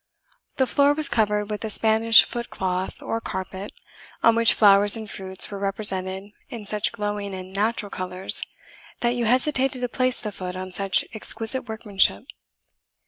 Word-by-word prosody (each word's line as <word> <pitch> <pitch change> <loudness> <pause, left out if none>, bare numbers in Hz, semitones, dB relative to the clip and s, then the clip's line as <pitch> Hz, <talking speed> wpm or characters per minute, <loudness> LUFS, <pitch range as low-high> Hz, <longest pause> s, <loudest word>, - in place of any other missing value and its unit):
The 265 - +1
floor 285 +3 +2
was 310 -1 +6
covered 210 -2 -1
with 210 - -5
a 220 - -3
Spanish 220 +1 +5
foot 235 -1 -6
cloth, 185 0 -4
or 225 - -3
carpet, 190 +1 -6 0.5
on 230 - +5
which 230 0 +5
flowers 205 0 +5
and 220 -1 -8
fruits 190 0 -1
were 200 - -6
represented 195 -1 -1 0.2
in 225 -3 -8
such 210 +1 -1
glowing 205 -3 -4
and 185 0 -10
natural 210 0 -2
colours, 185 +1 -2 0.6
that 240 0 +1
you 240 -1 -2
hesitated 260 +2 0
to 245 - -2
place 255 +1 -1
the 210 - -5
foot 185 -2 -7
on 185 0 -7
such 195 +1 0
exquisite 225 +3 +1
workmanship. 205 - 0
210 Hz, 160 wpm, -23 LUFS, 195-230 Hz, 0.6 s, was